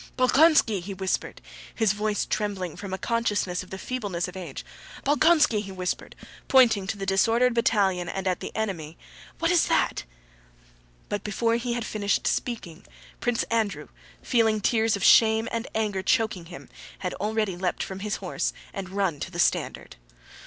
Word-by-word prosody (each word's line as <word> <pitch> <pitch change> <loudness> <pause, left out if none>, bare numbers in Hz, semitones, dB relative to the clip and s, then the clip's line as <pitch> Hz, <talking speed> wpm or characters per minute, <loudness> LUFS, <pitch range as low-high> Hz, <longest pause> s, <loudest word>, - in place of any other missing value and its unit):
"Bolkónski!" 255 - +4
he 195 +2 -6
whispered, 190 0 -3 0.3
his 220 -3 +2
voice 210 0 -1
trembling 195 -5 -2
from 200 -2 -7
a 190 - -2
consciousness 205 -6 -1
of 185 - -12
the 190 - -6
feebleness 200 -7 -3
of 180 - -10
age, 175 -7 -7 0.4
"Bolkónski!" 295 -5 +4
he 195 -2 -8
whispered, 185 -1 -4 0.3
pointing 230 -7 +5
to 205 - -3
the 195 - -4
disordered 230 +6 +3
battalion 190 -6 +1
and 195 -1 -4
at 180 -1 0
the - - -6
enemy, 175 -8 -3 0.4
"what's 330 0 +3
that?" - - +1 1.0
But 205 - -3
before 230 +3 0
he 240 0 -2
had 235 -1 -3
finished 205 -2 -1
speaking, 190 -8 -3 0.4
Prince 240 -1 0
Andrew, 220 -4 -1 0.3
feeling 225 -3 +2
tears 220 +1 +2
of 200 - -4
shame 220 0 +6
and 230 0 -3
anger 210 -3 0
choking 205 -3 +1
him, 175 +1 -11 0.3
had 180 - -4
already 215 -2 -1
leapt 180 0 -2
from 190 0 -6
his 210 +1 -2
horse - - -2 0.2
and 195 -2 -5
run 190 -6 -1
to - - -4
the - - -9
standard. - - 0
205 Hz, 160 wpm, -26 LUFS, 190-230 Hz, 1.0 s, shame